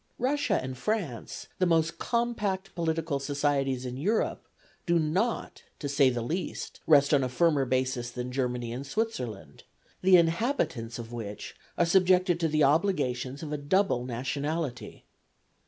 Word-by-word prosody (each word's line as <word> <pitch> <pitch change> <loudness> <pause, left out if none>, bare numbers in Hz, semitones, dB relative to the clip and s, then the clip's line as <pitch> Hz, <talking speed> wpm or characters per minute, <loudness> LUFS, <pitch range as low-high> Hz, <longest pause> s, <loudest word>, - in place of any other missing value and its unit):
Russia 255 -5 +1
and 130 -1 -6
France, 185 - -3
the 185 - +3
most 165 -1 +1
compact 210 -5 -1
political 160 -3 -1
societies 140 -2 0
in 125 0 -5
Europe, 205 +11 -1 0.4
do 170 0 +4
not, 180 +9 -1 0.2
to 145 - -4
say 140 -1 +4
the 120 -2 -2
least, 170 +8 -4
rest 145 -1 +5
on 140 -2 +4
a 130 - -1
firmer 145 +1 +2
basis 130 -1 -1
than 125 +1 -5
Germany 125 -2 -2
and 135 +3 -6
Switzerland, 135 - -4 0.4
the 185 0 +7
inhabitants 165 - 0
of 120 0 -8
which 105 -3 -6 0.2
are 175 - +4
subjected 180 0 +3
to 165 - +2
the 155 -1 +2
obligations 140 -4 +1
of 150 -1 -4
a - - -1
double 145 -3 +1
nationality. 135 +4 -4
145 Hz, 145 wpm, -28 LUFS, 130-180 Hz, 0.4 s, the